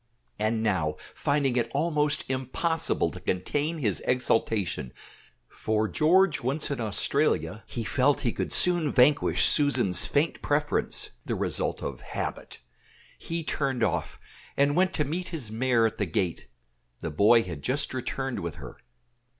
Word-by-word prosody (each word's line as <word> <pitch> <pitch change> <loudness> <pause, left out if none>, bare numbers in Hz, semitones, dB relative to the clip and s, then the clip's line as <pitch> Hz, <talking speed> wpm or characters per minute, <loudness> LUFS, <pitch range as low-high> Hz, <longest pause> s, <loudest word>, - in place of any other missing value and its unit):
And 110 +1 0
now, 85 -8 0 0.2
finding 140 -3 0
it 115 -1 0
almost 150 -1 +1
impossible 135 +6 -1
to - - -9
contain 145 - -2
his 110 - -1
exultation 110 - 0 0.5
for 110 0 -1
George 165 - +3
once 140 +5 0
in 140 - -3
Australia 105 -3 0
he - - -5
felt - - +1
he - - 0
could - - -4
soon 175 -5 +5
vanquish 140 +3 +4
Susan's 120 - +3
faint 150 +3 0
preference, 145 0 -1
the - - -2
result - - -2
of - - -5
habit - - -6 0.6
he 165 0 -4
turned 135 -6 -1
off, 100 - -2 0.4
and 140 +1 +3
went 185 +1 +3
to 150 - +1
meet 175 +6 -3
his 150 - -6
mare 115 0 +2
at 110 - -1
the 105 - -1
gate; 85 0 -2 0.5
the 80 - -4
boy 105 +8 +5
had 85 -6 -7
just 130 - -2
returned 130 0 -3
with 85 -3 -5
her. 70 -3 -10
130 Hz, 145 wpm, -27 LUFS, 105-150 Hz, 0.6 s, soon